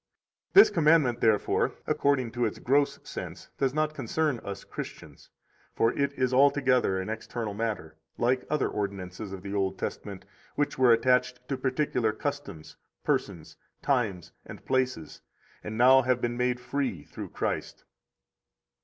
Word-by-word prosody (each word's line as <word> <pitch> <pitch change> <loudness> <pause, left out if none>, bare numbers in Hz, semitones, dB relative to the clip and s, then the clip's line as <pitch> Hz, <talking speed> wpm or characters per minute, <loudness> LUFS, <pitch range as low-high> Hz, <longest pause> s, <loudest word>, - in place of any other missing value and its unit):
82 - - +9
This 400 - +9
commandment, 150 -7 +3
therefore, 110 -2 +2
according 130 -4 +1
to 120 +1 -2
its 110 - -3
gross 140 +3 +2
sense, - - -8
does 135 -2 +2
not 155 +2 0
concern 155 -4 -1
us 100 -1 -6
Christians; - - -9 0.5
for 115 - +2
it 140 0 0
is 130 -1 0
altogether 130 -6 +3
an 95 - -4
external 110 0 -4
matter, 100 -8 -4 0.2
like 125 +2 +1
other 150 -1 +1
ordinances 100 -1 -5
of 95 -1 -8
the 100 0 -5
Old 95 -1 -1
Testament, 95 -1 -6 0.3
which 145 - 0
were 125 -2 +6
attached 125 +1 +2
to 135 - 0
particular 130 -4 0
customs, 110 - -6 0.3
persons, - - -2 0.3
times, 110 - 0
and - - -11
places, 130 - -1 0.4
and 110 +1 -5
now 130 +2 +7
have 130 -1 +1
been 120 0 -2
made 125 0 0
free 125 - -3
through - - -8
Christ. - - -3
125 Hz, 145 wpm, -28 LUFS, 105-135 Hz, 0.5 s, 82